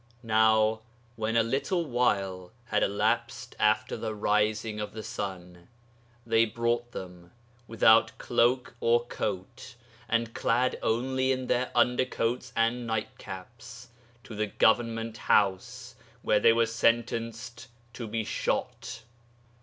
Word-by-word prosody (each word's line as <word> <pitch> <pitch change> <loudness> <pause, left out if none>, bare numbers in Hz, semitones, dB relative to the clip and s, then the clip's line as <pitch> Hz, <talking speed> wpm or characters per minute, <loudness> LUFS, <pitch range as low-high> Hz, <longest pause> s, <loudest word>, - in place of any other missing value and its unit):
'Now 110 0 +3 0.4
when 110 0 -1
a 115 - +5
little 140 +9 -1
while 100 - -1 0.2
had - - +1
elapsed 100 +1 -1
after 110 0 +2
the 110 -1 -4
rising 105 +1 0
of 105 - -5
the 110 0 -7
sun, 90 -6 -6 0.6
they 115 0 +4
brought 115 +1 -1
them, 90 -3 -9 0.4
without 115 0 +4
cloak 120 +1 +1
or 120 0 +2
coat, 110 +3 -5 0.3
and 115 0 0
clad 125 +2 +1
only 130 +3 0
in 130 -1 -1
their 125 0 0
undercoats 125 0 +1
and 115 +1 0
nightcaps, 115 +2 -7 0.3
to - - -10
the 105 0 -1
Government 115 +1 +1
House, 120 +6 0 0.3
where 105 - +3
they 115 - +6
were 115 0 +3
sentenced 115 +1 -1 0.3
to 115 - -6
be 110 +1 -2
shot. - - -3
115 Hz, 120 wpm, -28 LUFS, 110-120 Hz, 0.6 s, they